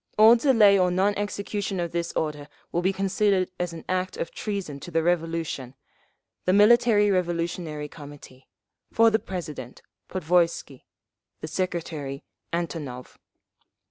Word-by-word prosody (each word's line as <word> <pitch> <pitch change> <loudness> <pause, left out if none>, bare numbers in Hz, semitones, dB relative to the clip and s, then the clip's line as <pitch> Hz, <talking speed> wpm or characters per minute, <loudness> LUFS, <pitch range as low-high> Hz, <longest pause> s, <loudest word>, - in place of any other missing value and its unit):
All 220 +2 +8
delay 225 -6 +5
or 180 -1 +3
non 190 +3 +2
execution 205 -1 -3
of 170 -1 -2
this 170 0 -2
order 150 -2 -3 0.2
will 175 - 0
be 185 +2 +2
considered 195 -1 +1
as 175 -1 -1
an 165 -1 -9
act 185 0 -2
of - - -4
treason 195 -9 -4
to 175 - -9
the 165 -1 0
Revolution. 165 -6 -1 0.7
The 185 - +3
Military 210 0 +5
Revolutionary 170 -4 -2
Committee. 145 -3 -13 0.4
For 230 0 +5
the 220 - +2
President, 155 - -7 0.3
Podvoisky. 170 -6 0 0.6
The - - -5
Secretary, 160 -5 -4 0.3
Antonov. 155 -7 -5
175 Hz, 130 wpm, -25 LUFS, 155-200 Hz, 0.7 s, All